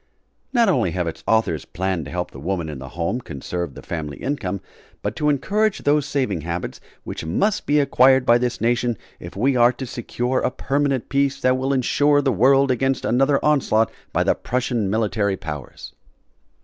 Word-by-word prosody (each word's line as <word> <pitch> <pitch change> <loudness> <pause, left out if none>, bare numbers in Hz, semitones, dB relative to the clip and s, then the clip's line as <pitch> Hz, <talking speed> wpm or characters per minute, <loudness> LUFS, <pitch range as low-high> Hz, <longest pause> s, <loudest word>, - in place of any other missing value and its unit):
Not 235 -3 +3
only 125 - +2
have 90 - 0
its 85 - -6
authors 110 -9 +1
planned 95 -3 -3
to 70 - -8
help 90 0 -3
the 65 - -10
woman 85 +1 -2
in 75 -3 -6
the 65 - -8
home, 85 +9 -1
conserve 85 - -5
the - - -10
family 75 -4 -5
income, 105 -9 -3 0.4
but - - -2
to 150 - +1
encourage 200 +9 0
those 145 0 +2
saving 130 - -1
habits 85 +2 -5 0.2
which - - -6
must 190 - 0
be 150 +1 +4
acquired 130 -2 +4
by 120 0 +5
this 120 -1 -1
nation 120 0 +1 0.2
if 85 - -9
we 130 +7 +2
are 120 0 +5
to 130 - -6
secure 125 +1 -2
a - - +1
permanent 135 0 -1
peace 140 0 +1
that 130 0 +3
will 130 +1 -1
insure 145 +2 +3
the 135 -2 +1
world 135 +5 +4
against 135 +1 0
another 135 +3 +3
onslaught 130 -7 +2 0.2
by - - +1
the - - +3
Prussian 120 -5 -1
military 105 -2 0
powers. 75 -5 -8
125 Hz, 185 wpm, -22 LUFS, 90-135 Hz, 0.4 s, by